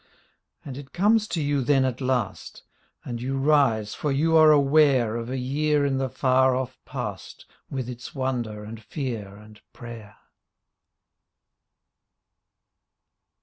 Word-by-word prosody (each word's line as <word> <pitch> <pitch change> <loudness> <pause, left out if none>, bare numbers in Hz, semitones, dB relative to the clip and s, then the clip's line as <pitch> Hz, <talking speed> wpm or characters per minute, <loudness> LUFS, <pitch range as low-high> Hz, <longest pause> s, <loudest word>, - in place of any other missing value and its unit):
And 135 -1 -7
it 140 -1 -12
comes 215 +4 +3
to 170 - -3
you 145 -1 0
then 135 0 +3
at 130 0 -3
last 125 -5 -2 0.2
— - - -39
And 120 -1 -5
you 135 +2 -2
rise 135 -7 +2
for 150 - -2
you 160 +4 +2
are 155 -1 +7
aware 140 -5 +4
Of 115 0 -4
a 130 - -3
year 145 +3 +1
in 135 -1 0
the 135 -1 -1
far 130 0 +2
off 130 0 -4
past - - -7 0.2
With 130 -3 -4
its 125 +2 -8
wonder 120 -6 -3
and 110 +1 -9
fear 115 -8 -5
and 105 0 -16
prayer. 115 -4 -10
130 Hz, 140 wpm, -25 LUFS, 120-145 Hz, 0.2 s, are